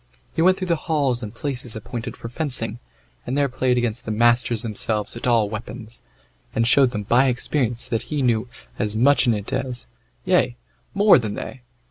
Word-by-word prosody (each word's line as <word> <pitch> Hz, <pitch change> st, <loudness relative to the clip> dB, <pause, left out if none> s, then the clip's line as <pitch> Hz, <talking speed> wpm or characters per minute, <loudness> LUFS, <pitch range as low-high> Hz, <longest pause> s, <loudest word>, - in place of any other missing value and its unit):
He -, -, 0 dB
went 185 Hz, +2 st, +5 dB
through 185 Hz, -, -3 dB
the 170 Hz, -2 st, +2 dB
halls 140 Hz, -6 st, +1 dB
and 105 Hz, -3 st, -5 dB
places 125 Hz, -1 st, -4 dB
appointed 115 Hz, +2 st, -6 dB
for -, -, -7 dB
fencing, 120 Hz, -4 st, -3 dB, 0.4 s
and 130 Hz, +3 st, -3 dB
there 145 Hz, -1 st, +3 dB
played 130 Hz, -1 st, 0 dB
against 120 Hz, -1 st, -1 dB
the -, -, -7 dB
masters 120 Hz, +1 st, +3 dB
themselves 110 Hz, -1 st, -1 dB
at 120 Hz, +3 st, -4 dB
all 115 Hz, -3 st, +3 dB
weapons, 110 Hz, +2 st, -7 dB, 0.5 s
and 115 Hz, -, +2 dB
showed 135 Hz, +1 st, +5 dB
them 105 Hz, -3 st, -4 dB
by 125 Hz, +6 st, +3 dB
experience 125 Hz, -1 st, -1 dB
that 115 Hz, -1 st, -1 dB
he 150 Hz, -3 st, -1 dB
knew 120 Hz, -1 st, +1 dB, 0.3 s
as 105 Hz, 0 st, 0 dB
much 135 Hz, +4 st, +4 dB
in 115 Hz, -, +4 dB
it 105 Hz, -1 st, -5 dB
as, 130 Hz, -2 st, -3 dB, 0.4 s
yea, -, -, +2 dB, 0.4 s
more 205 Hz, -5 st, +6 dB
than, 110 Hz, -3 st, -4 dB
they. 130 Hz, -, -7 dB
120 Hz, 185 wpm, -22 LUFS, 110-135 Hz, 0.5 s, more